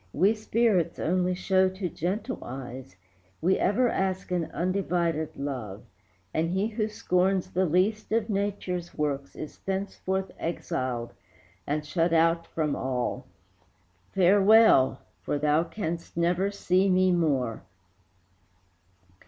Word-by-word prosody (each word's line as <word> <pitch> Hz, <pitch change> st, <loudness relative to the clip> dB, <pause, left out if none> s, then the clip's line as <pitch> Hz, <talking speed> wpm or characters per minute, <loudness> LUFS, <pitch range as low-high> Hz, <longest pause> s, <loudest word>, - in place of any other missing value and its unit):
We 195 Hz, +8 st, +4 dB
spirits 215 Hz, -5 st, +1 dB
only 180 Hz, +2 st, 0 dB
show 190 Hz, +1 st, +2 dB
to 190 Hz, 0 st, -4 dB
gentle 195 Hz, -, -3 dB
eyes. 125 Hz, -5 st, -8 dB, 0.4 s
We 185 Hz, +4 st, +2 dB
ever 245 Hz, +6 st, +2 dB
ask 190 Hz, -4 st, -1 dB
an 175 Hz, -2 st, 0 dB
undivided 170 Hz, -3 st, -1 dB
love, 125 Hz, -8 st, -5 dB, 0.5 s
And 165 Hz, +1 st, 0 dB
he 190 Hz, +3 st, 0 dB
who 215 Hz, -1 st, -1 dB
scorns 185 Hz, -2 st, 0 dB
the 185 Hz, 0 st, +1 dB
least 195 Hz, +7 st, +1 dB
of 225 Hz, -1 st, +1 dB
Nature's 195 Hz, -4 st, -3 dB
works 140 Hz, -2 st, -2 dB
Is 155 Hz, -, -8 dB
thenceforth 190 Hz, 0 st, -3 dB
exiled 130 Hz, -8 st, -3 dB, 0.5 s
and 150 Hz, +1 st, -1 dB
shut 165 Hz, +2 st, 0 dB
out 165 Hz, +1 st, +3 dB
from 155 Hz, -3 st, -1 dB
all. 125 Hz, -2 st, -2 dB, 0.9 s
Farewell! 195 Hz, -5 st, +5 dB, 0.2 s
for 145 Hz, -, -2 dB
thou 150 Hz, +2 st, +2 dB
canst 170 Hz, -5 st, -5 dB
never 175 Hz, +3 st, +2 dB
see 195 Hz, -1 st, +1 dB
me 185 Hz, 0 st, +4 dB
more." 140 Hz, -10 st, 0 dB
180 Hz, 120 wpm, -27 LUFS, 155-195 Hz, 0.9 s, Farewell